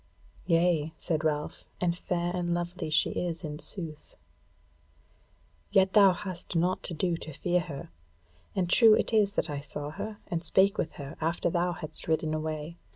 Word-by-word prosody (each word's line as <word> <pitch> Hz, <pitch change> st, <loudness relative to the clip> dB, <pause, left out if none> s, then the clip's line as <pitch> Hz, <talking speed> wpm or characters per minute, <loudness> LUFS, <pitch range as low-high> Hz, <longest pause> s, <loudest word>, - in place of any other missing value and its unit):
"Yea," 165 Hz, -3 st, +3 dB
said 160 Hz, -1 st, -1 dB
Ralph, 150 Hz, -1 st, -1 dB, 0.2 s
"and 170 Hz, -1 st, +1 dB
fair 175 Hz, 0 st, -2 dB
and 175 Hz, -1 st, 0 dB
lovely 175 Hz, -1 st, -3 dB
she 155 Hz, -, +3 dB
is 170 Hz, -1 st, -3 dB
in 150 Hz, -1 st, -5 dB
sooth. 165 Hz, -5 st, -7 dB, 1.6 s
Yet 195 Hz, -1 st, +4 dB
hast 190 Hz, -3 st, +3 dB
thou -, -, +4 dB
naught 180 Hz, +2 st, +1 dB
to 170 Hz, -, -3 dB
do 175 Hz, +2 st, +1 dB
to 160 Hz, -, -8 dB
fear 175 Hz, +4 st, +1 dB
her. 150 Hz, -, -7 dB, 0.6 s
And 185 Hz, -3 st, +1 dB
true 220 Hz, +4 st, +7 dB
it -, -, -1 dB
is 205 Hz, -2 st, +4 dB
that 175 Hz, -, 0 dB
I 145 Hz, -3 st, -3 dB
saw 145 Hz, 0 st, -5 dB
her 210 Hz, +6 st, -6 dB
and 170 Hz, -1 st, -3 dB
spake 195 Hz, +5 st, +3 dB
with 155 Hz, -, -1 dB
her 140 Hz, -1 st, -8 dB
after 170 Hz, +1 st, 0 dB
thou 175 Hz, +1 st, +1 dB
hadst 155 Hz, -1 st, -6 dB
ridden 160 Hz, -1 st, +1 dB
away. 155 Hz, +1 st, -3 dB
170 Hz, 170 wpm, -29 LUFS, 155-180 Hz, 1.6 s, true